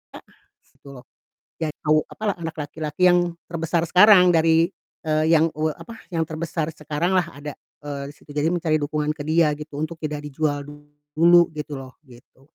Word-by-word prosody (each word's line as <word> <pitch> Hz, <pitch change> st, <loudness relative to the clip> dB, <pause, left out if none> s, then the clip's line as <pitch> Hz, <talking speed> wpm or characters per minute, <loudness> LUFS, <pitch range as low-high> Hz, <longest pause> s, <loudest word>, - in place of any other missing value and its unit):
A -, -, -8 dB, 0.5 s
se -, -, -34 dB
tuh 140 Hz, -1 st, -12 dB
loh, 125 Hz, -, -14 dB, 0.6 s
ya 160 Hz, -, 0 dB, 0.2 s
tau 155 Hz, 0 st, +4 dB
apalah, 215 Hz, -2 st, -2 dB
anak 165 Hz, 0 st, -5 dB
laki-laki 150 Hz, +3 st, -2 dB
yang 175 Hz, -, +5 dB, 0.3 s
terbesar 170 Hz, 0 st, -1 dB
sekarang 180 Hz, 0 st, +6 dB
dari, 165 Hz, 0 st, +4 dB, 0.4 s
eee, 155 Hz, 0 st, +1 dB
yang 165 Hz, -1 st, +5 dB
u 155 Hz, +1 st, -1 dB
apa 225 Hz, +9 st, -9 dB
yang 165 Hz, -2 st, 0 dB
terbesar 160 Hz, 0 st, -4 dB
sekarang 155 Hz, +4 st, -2 dB
lah 180 Hz, -3 st, +2 dB
ada, 145 Hz, -1 st, -8 dB, 0.3 s
eee, 140 Hz, -1 st, -5 dB
di -, -, -12 dB
situ -, -, -25 dB
jadi 150 Hz, +2 st, +1 dB
mencari 165 Hz, -3 st, +1 dB
dukungan 150 Hz, +1 st, -1 dB
ke 150 Hz, -, -9 dB
dia 155 Hz, 0 st, +2 dB
gitu 150 Hz, -1 st, -9 dB
untuk 160 Hz, +2 st, -4 dB
tidak 150 Hz, -1 st, -4 dB
dijual 145 Hz, 0 st, -2 dB, 0.5 s
dulu 170 Hz, +1 st, +6 dB
gitu 150 Hz, 0 st, -6 dB
loh, 130 Hz, -1 st, -11 dB
gitu. 125 Hz, 0 st, -19 dB
155 Hz, 180 wpm, -23 LUFS, 150-170 Hz, 0.6 s, sekarang